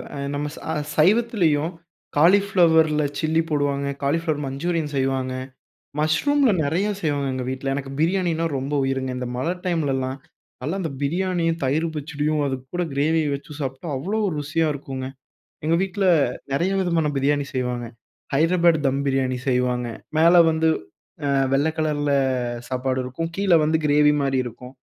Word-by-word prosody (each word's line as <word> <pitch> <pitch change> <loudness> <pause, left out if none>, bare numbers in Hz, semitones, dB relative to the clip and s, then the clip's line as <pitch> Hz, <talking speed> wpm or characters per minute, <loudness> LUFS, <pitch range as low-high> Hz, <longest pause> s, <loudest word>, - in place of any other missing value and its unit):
அ - - -5 0.2
நம்ம 145 +1 -2
சா 160 - -4 0.2
சைவத்திலேயும் 175 -4 +3 0.5
காலிஃப்ளவர்ல 165 -3 +4 0.2
சில்லி 160 0 +2
போடுவாங்க, 140 -1 0 0.2
காலிஃப்ளவர் 150 +1 0
மஞ்சூரியன் 150 +2 -2
செய்வாங்க, 130 -1 0 0.7
மஷ்ரூம்ல 260 - +3
நெறையா 180 +9 0
செய்வாங்க 145 -3 0
எங்க 130 -1 -3
வீட்ல. 130 +1 -4
எனக்கு 135 -1 -5
பிரியாணின்னா 170 -1 +1
ரொம்ப 135 +2 -4
உயிருங்க. 135 -1 -1
இந்த 125 -1 -3
மழை 165 +7 0
டைம்லலாம், 135 -6 -1 0.5
நல்லா 160 +8 -2
அந்த 160 - -3
பிரியாணியும், 170 +2 0
தயிரும் 160 +5 0
பச்சடியும், 150 0 -1
அதுக்கு 130 -1 -4
கூட 175 - +1
கிரேவிய 155 +2 +1
வச்சு 145 +2 -10
சாப்ட்டா 135 +4 -5
அவ்ளோ 195 +11 -2 0.2
ருசியா 155 +2 0
இருக்குங்க. 135 -2 -6 0.6
எங்க 165 +1 +3
வீட்ல, 195 +1 -1 0.5
நெறைய 170 +7 +1
விதமான 170 -4 +1
பிரியாணி 145 +1 +1
செய்வாங்க, 125 -1 -2 0.5
ஹைட்ராபேடு 170 +1 +4
தம் 135 +1 0
பிரியாணி 130 -2 0
செய்வாங்க. 125 -1 +1 0.3
மேல 170 +2 +6 0.2
வந்து 160 0 +1 0.6
அ - - 0 0.2
வெள்ளை 145 +4 +2
கலர்ல 150 -2 0 0.6
சாப்பாடு 130 0 -1
இருக்கும். 130 +6 -4
கீழே 195 -3 +3
வந்து 155 +1 +2
கிரேவி 150 0 +4
மாரி 135 -1 +1
இருக்கும். 125 +2 -9
150 Hz, 140 wpm, -23 LUFS, 135-165 Hz, 0.7 s, மேல